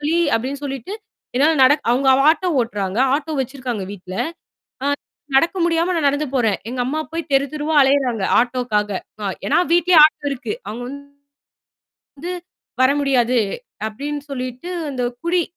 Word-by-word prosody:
வலி 315 +3 +1 0.2
அப்பிடின்னு 270 +5 -2
சொல்லிட்டு 270 - -5 0.4
என்னால 295 +6 +4
நடக் 290 +3 +4
அவுங்க 265 +3 +2
வ - - +2
ஆட்டோ 365 +3 0
ஓட்டுறாங்க. 205 -3 -2 0.2
ஆட்டோ 310 +2 -2
வச்சிருக்காங்க 255 -4 -4
வீட்ல. 185 -2 -9 0.7
ஆ 280 - 0 0.5
நடக்க 330 +7 +3
முடியாம 340 +1 +1
நான் 315 -4 +2
நடந்து 285 +2 0
போறேன். 225 -6 +2
எங்க 250 +1 -5
அம்மா 290 +5 -2
போய்த் 330 0 -5
தெருத்தெருவா 295 +3 0
அலையுறாங்க, 265 -6 +2 0.2
ஆட்டோவுக்காக. 240 -4 0 0.6
ஏன்னா - - +2
வீட்டிலேயே 345 0 +5
ஆட்டோ 305 -1 -1
இருக்கு. 275 +8 -4
அவுங்க 240 +3 -5
வந்து, 280 +1 -8 1.2
வந்து 345 +5 -4 0.5
வர 260 - +5
முடியாது 255 -3 +2 0.5
அப்பிடின்னு 285 +7 -5
சொல்லிட்டு 255 +5 -5 0.2
அந்தக் 245 -2 -3
குடி, 345 +1 +2
270 Hz, 145 wpm, -20 LUFS, 245-305 Hz, 1.2 s, வீட்டிலேயே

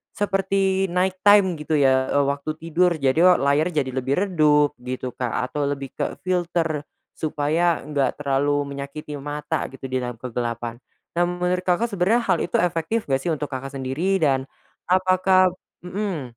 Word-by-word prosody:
seperti 195 -1 +1
night 185 +1 0
time 190 -5 +5
gitu 155 +1 -1
ya, 130 -2 +3
eee, 145 - +4
waktu 140 +2 -2
tidur 170 +2 +1
jadi 140 0 +1
e 180 +2 +7
layarnya 150 +2 +2
jadi 130 - -6
lebih 130 +2 -1
redup 150 -6 +3
gitu 125 0 -5
Kak, 125 -2 -3 0.2
atau 145 -1 -1
lebih 140 -2 -4
kefilter 170 -4 -2 0.2
supaya 160 +2 0
enggak 145 -2 -1
terlalu 145 +1 +1
menyakiti 140 +1 -7
mata 150 +1 -3
gitu 135 -1 -9
di 130 - +1
dalam 125 -1 -4
kegelapan. 120 -1 -4 0.4
Nah - - +5
menurut 180 +1 -1
Kakak 225 +7 +1
sebenarnya 200 +5 +2
hal - - +2
itu 175 - -2
efektif 175 +6 -1
nggak 135 - +3
sih 135 - -6
untuk 150 -1 -5
Kakak 135 +1 -6
sendiri 160 +9 -1
dan 135 -2 +1 0.4
apakah 185 0 +4 0.3
hmm. 180 - -4
150 Hz, 160 wpm, -23 LUFS, 135-180 Hz, 0.4 s, e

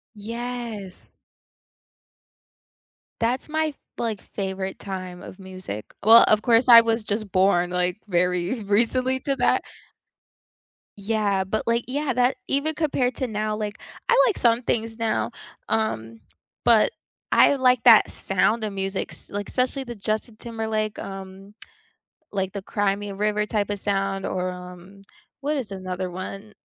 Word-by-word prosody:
Yes. 230 -2 -5 2.1
That's 245 +6 0
my, 315 -1 0 0.2
like, 225 -4 -2
favorite 190 -1 -5
time 185 -2 -6
of 185 - -11
music. 185 - -7 0.2
Well, 225 +3 +9
of 215 0 +4
course 235 +1 +3
I 230 -1 +11
was 225 0 0
just 210 -1 -3
born, 185 -2 +3
like, 180 +2 0
very 180 +4 0
recently 245 +6 +1
to 275 -1 -1
that. - - +2 1.4
Yeah, 200 -2 0
but, 195 +3 -2
like 230 0 +1
yeah 280 +1 -1
that 250 +2 +2
even 300 +3 0
compared 275 -5 0
to 260 - -2
now, 215 -1 -2
like, 210 0 -4 0.3
I 475 - +5
like 425 - 0
some 235 0 +4
things 225 -1 -1
now, 225 -1 -1 0.4
um, 115 - -1 0.4
but 230 - +5 0.4
I 280 - +6
like 250 -2 +3
that - - +7
sound 225 +1 +1
of 215 - -2
music 195 0 -3
s - - -10
like 205 0 -4
especially 255 +1 0
the 240 -1 -7
Justin 215 +2 -3
Timberlake, 220 -2 -3
um, 195 +1 -9 0.8
like 190 -1 -1
the 200 0 -5
Cry 200 0 0
Me 205 0 -6
a 195 - -6
River 210 +1 0
type 210 -2 -1
of 205 -1 -2
sound 195 -1 -1
or, 185 0 -2
um, 180 +2 -11 0.4
what 290 +2 -1
is 225 -7 -4
another 185 -1 -4
one? 195 +3 -7
210 Hz, 145 wpm, -24 LUFS, 190-235 Hz, 2.1 s, I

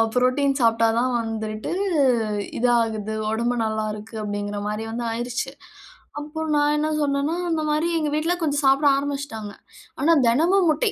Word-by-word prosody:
Protein 270 +2 +2
சாப்பிட்டா 230 0 +4
தான் 255 +1 +1
வந்துட்டு, 220 -1 -4 0.9
இதாகுது 225 -3 +1 0.2
உடம்பு 235 +2 0
நல்லா 220 0 -1
இருக்குது. 220 +1 -8
அப்படிங்கிற 205 0 -3
மாரி 215 +1 -3
வந்து 235 +1 -3
ஆயிருச்சு. 245 +3 -3 0.7
அப்ப 310 +2 -5
நான் 295 0 +3
என்ன 305 +1 0
சொன்னேன்னா, 285 +3 0
அந்த 320 -1 0
மாரி 305 +3 +1
எங்க 305 - -1
வீட்ல 330 +3 +1
கொஞ்சம் 290 -1 0
சாப்பிட 275 +2 +4
ஆரம்பிச்சுட்டாங்க. 275 -7 -4 0.5
ஆனா 325 +4 +4 0.2
தினமும் 340 +9 +3
முட்டை, 420 +8 +1
250 Hz, 145 wpm, -23 LUFS, 220-295 Hz, 0.9 s, சாப்பிட்டா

